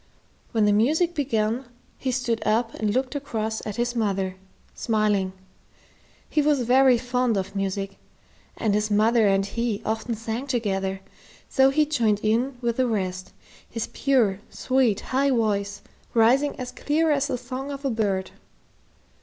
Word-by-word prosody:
When 220 -2 +2
the 205 - +4
music 310 - +2
began, 245 -4 0 0.3
he 260 - -1
stood 240 -3 -1
up 225 +2 +1
and 215 -1 -1
looked 255 +4 -1
across 225 -6 -3
at 210 - -4
his 240 +1 -1
mother, 195 -4 -1 0.4
smiling. 210 -4 +1 1.0
He 305 - +1
was 290 -2 +2
very 255 +1 +5
fond 250 -2 0
of 195 +1 -4
music, 195 0 -3 0.6
and 215 -3 0
his 210 +1 +1
mother 215 +1 +4
and 195 0 +2
he 230 0 -2
often 225 +2 -2
sang 225 +4 -4
together, 195 -6 -1 0.5
so 265 -1 +5
he 300 +3 +3
joined 230 -9 +1
in 240 +5 +1
with 235 -1 -1
the 255 -1 +2
rest, 185 -4 -2 0.4
his 230 -2 -3
pure, 235 -9 +2
sweet, 255 -6 +1
high 275 +2 +1
voice 205 -5 0 0.3
rising 260 +6 +3
as 250 -1 -5
clear 315 +2 +1
as 285 -1 +1
the 255 - -2
song 255 +3 -6
of 280 0 -7
a 270 - +1
bird. 200 -4 -1
230 Hz, 155 wpm, -25 LUFS, 210-260 Hz, 1.0 s, very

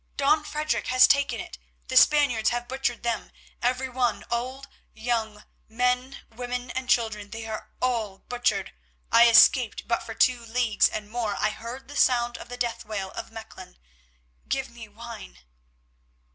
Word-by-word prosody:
"Don 300 +2 +3
Frederic 305 0 -2
has 255 0 +7
taken 280 0 +2
it; - - -8 0.3
the 260 - -4
Spaniards 255 -6 +5
have 240 0 -3
butchered 255 -2 -2
them; 235 -2 -2 0.3
everyone, 250 0 0
old 255 +3 -3 0.3
and 220 - -15
young, 220 -3 -1 0.3
men, 250 +3 -1
women, 245 +1 -5
and 260 0 -5
children, 215 -4 +1
they 225 +1 -7
are 220 -1 -6
all 225 -6 -1
butchered. 240 -6 -2 0.4
I 235 +1 +7
escaped, 230 0 +5
but 235 - 0
for 225 - -8
two 245 0 +3
leagues 230 -1 +2
and 210 -1 -5
more 220 -2 -2
I - - +1
heard 240 +5 -8
the 290 - -10
sound 240 -3 +2
of - - -11
the 245 - -7
death 240 -2 -2
wail 200 -3 -5
of - - -7
Mechlin. 220 - -11 0.7
Give 270 -2 -2
me 235 -2 -11
wine." 210 - -10
240 Hz, 160 wpm, -26 LUFS, 220-255 Hz, 0.7 s, has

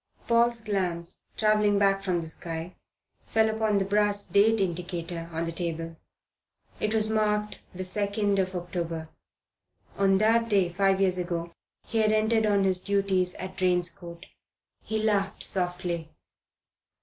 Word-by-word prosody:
Paul's 235 0 +3
glance, 180 -5 -3 0.2
travelling 210 -1 +3
back 195 -1 +3
from 180 -3 0
the 165 - -6
sky, 165 +2 -6 0.5
fell 220 0 +2
upon 220 -1 +1
the 195 - +1
brass 205 0 +1
date 220 +2 +4
indicator 175 -2 -3
on 165 +1 -2
the 165 - -3
table. 165 -1 -4 0.8
It 215 +1 0 0.2
marked 210 -1 0
the 185 - -4
2nd 200 +1 0
of 185 0 -1
October. 170 -2 -4 0.9
On 195 -1 +4
that 230 +3 +3
day 195 -4 +3
five 195 +2 +2
years 185 -2 +2
ago 170 -1 -3 0.3
he 225 - -1
had 215 -1 +3
entered 220 0 +2
on 200 -1 +3
his 190 -1 +2
duties 195 -2 0
at 185 0 -7
Drane's 180 -2 +1
Court. 170 +1 -11 0.6
He 220 - -3
laughed 200 -2 0
softly. 180 -3 -2
195 Hz, 140 wpm, -27 LUFS, 175-210 Hz, 0.9 s, date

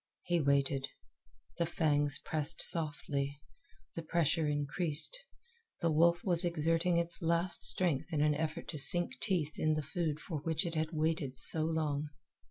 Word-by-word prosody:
He 175 -1 0
waited. 140 -1 0 0.7
The 170 - 0
fangs 145 -4 +1
pressed 155 -2 0
softly; 145 -3 0 0.5
the 165 - -5
pressure 165 -1 0
increased; 150 - +2 0.6
the 165 - 0
wolf 170 +3 +2
was 175 -2 +2
exerting 170 +1 +1
its 170 +2 -1
last 170 +2 +1
strength 175 -3 0
in 155 - -1
an 150 0 +2
effort 155 +2 -4
to 155 - -3
sink 140 -3 +3
teeth 160 -6 -2
in 155 0 +1
the 155 - -3
food 155 0 -3
for 155 -1 -6
which 160 +2 -2
it 170 - -4
had 155 0 -2
waited 155 -4 -2
so 155 +3 +5
long. 155 -2 -2
160 Hz, 155 wpm, -32 LUFS, 145-170 Hz, 0.7 s, so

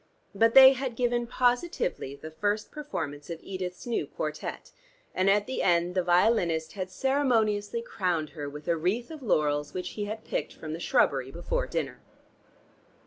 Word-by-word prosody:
But 225 +3 +3
they 265 0 +11
had 260 -2 -4
given 240 0 0
positively 250 - 0
the 155 +3 -9
first 205 +6 -1
performance 165 - -5
of 165 -1 -5
Edith's 185 -2 -5
new 240 -2 -1
quartette, - - -5 0.4
and 185 +1 +2
at 205 +1 +3
the 260 - -3
end 175 0 +2
the 185 - +2
violinist 175 -3 +2
had 185 -2 -4
ceremoniously 230 -3 +1
crowned 175 -9 -1
her 145 -3 -5
with 150 +1 -10
a 170 - +3
wreath 190 - -1
of 310 -2 -8
laurels 150 - 0
which 180 -1 -3
he 205 +2 -4
had 215 +2 -6
picked - - -3
from 155 -1 -7
the 165 - -5
shrubbery 135 -5 +2
before 175 - -2
dinner. - - -3
195 Hz, 165 wpm, -28 LUFS, 165-240 Hz, 0.4 s, they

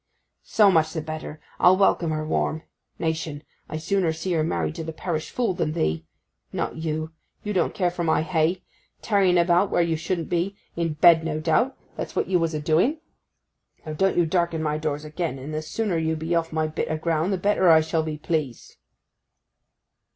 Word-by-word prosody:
'So 210 -3 +4
much 160 -2 +2
the 165 - -2
better. 155 0 -7 0.2
I'll 185 +1 +6
welcome 185 -4 +3
her 155 0 -2
warm. 155 0 -1 0.3
Nation! 160 -2 -3 0.3
I'd 155 0 -5
sooner 185 -1 +1
see 160 +4 -4
her 160 -2 +2
married 155 -1 -1
to 165 0 -6
the 160 - -5
parish 160 -1 -4
fool 235 -6 0
than 165 -4 -1
thee. 80 - -1 0.4
Not - - -3
you—you 160 +5 -5
don't 180 -4 0
care 180 -5 +1
for 175 0 -3
my 160 -1 +2
hay. 170 +1 0 0.4
Tarrying 195 -4 +3
about 175 +3 +3
where 175 - +2
you 165 -1 0
shouldn't 165 +1 -2
be, 180 +3 -1 0.2
in 165 -2 -1
bed, 160 +2 +6
no 155 -1 -2
doubt; 170 - +1 0.2
that's - - -5
what - - +1
you 180 -2 +2
was 165 -1 -1
a - - -1
doing. 165 - +2 0.9
Now, 155 - -5
don't 195 +4 +1
you 175 - +4
darken 170 -1 0
my 150 0 -1
doors 150 -1 -3
again, 155 -2 -3
and 140 +4 -7
the 155 - -2
sooner 180 +2 -2
you 160 0 0
be 160 +2 -3
off 165 -1 0
my 155 0 0
bit 155 +1 -3
o' 155 - -1
ground 165 +3 0
the 190 - +1
better 190 -1 +3
I 160 -1 +7
shall 160 +1 0
be 155 -1 -4
pleased. 150 -6 -3
160 Hz, 195 wpm, -24 LUFS, 155-175 Hz, 0.9 s, I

